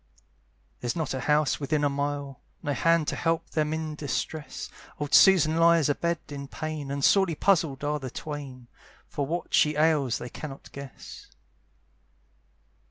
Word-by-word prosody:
There's 120 -1 -2
not 160 -5 -2
a 130 - -2
house 150 +2 +2
within 150 +1 0
a - - +4
mile. 140 -1 -3 0.2
No 145 - -1
hand 165 +1 +2
to - - -2
help 165 -1 -1
them 155 -1 0
in 160 -1 -3
distress: 150 +1 -4 0.3
Old 145 -1 -4
Susan 160 -1 +6
lies 165 -2 +5
a - - +4
bed 170 +3 -1
in 140 -1 -6
pain, 155 -1 -5
And 140 0 -3
sorely 190 -5 +4
puzzled 160 -7 +1
are 150 +1 0
the 130 -2 -6
twain, 135 -4 -7 0.4
For 140 -2 -3
what 170 +4 -4
she 150 0 +4
ails 150 -5 +2
they 120 - -7
cannot 140 0 -9
guess. 140 -2 -10
150 Hz, 160 wpm, -27 LUFS, 140-160 Hz, 0.4 s, Susan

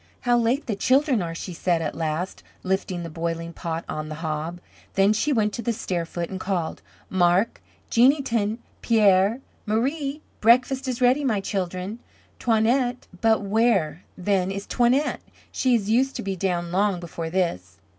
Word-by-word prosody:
"How 245 -1 +3
late 240 +4 +1
the 220 - -2
children 260 +1 +3
are," 165 -1 -4
she 180 +2 -6
said 170 0 +1
at 160 -2 -2
last, 160 +3 -3 0.2
lifting 185 -2 -1
the 165 - -5
boiling 165 +1 -3
pot 165 -1 -4
on 155 0 -4
the 155 - -5
hob. 160 +2 -4 0.4
Then 195 +2 +4
she 290 +8 0
went 215 -5 +1
to - - -3
the 235 - 0
stair 175 -5 -3
foot 170 +1 -4
and 190 - -4
called, 185 -4 -2 0.3
"Marc, 185 +3 +2 0.3
Jeanneton, 235 -4 +3 0.2
Pierre, 210 +1 +4 0.3
Marie. 275 +7 -1 0.2
Breakfast 255 +4 +4
is 255 -1 -3
ready, 255 +4 +4
my 225 -7 +1
children. 190 +2 -3 0.4
Toinette 245 +2 +1 0.2
but 220 -2 +3
where, 195 -6 +1
then, 185 0 +1
is 200 +1 -4
Toinette? 255 +5 +1 0.3
She 255 -2 +2
is 210 -2 0
used 265 +4 +2
to - - -4
be 195 -1 -2
down 175 -2 -1
long 195 0 +1
before 165 -1 -5
this." 95 - -2
200 Hz, 165 wpm, -24 LUFS, 175-240 Hz, 0.4 s, Then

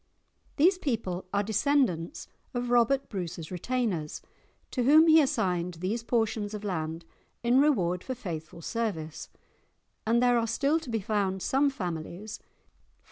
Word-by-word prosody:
These 360 +5 +4
people 215 - -2
are 200 0 +1
descendants 220 - 0 0.3
of 245 0 -2
Robert 245 +3 +3
Bruce's 175 -4 -5
retainers, 185 -5 -2 0.5
to 255 - -1
whom 300 +6 +7
he 320 -1 +7
assigned 180 - 0
these 190 +8 -2
portions 225 -3 -1
of 210 - -7
land 165 -4 -3 0.4
in 245 +3 +4
reward 180 - +2
for 260 - -4
faithful 165 -7 -7
service, 185 -10 -3 0.8
and 230 +1 +4
there 245 -1 +4
are 230 - -1
still 280 +7 +1
to 315 - -10
be 225 -2 -1
found 195 -3 -1
some 280 +2 +3
families 180 - -5
(_e. - - -37
220 Hz, 140 wpm, -28 LUFS, 180-255 Hz, 0.8 s, whom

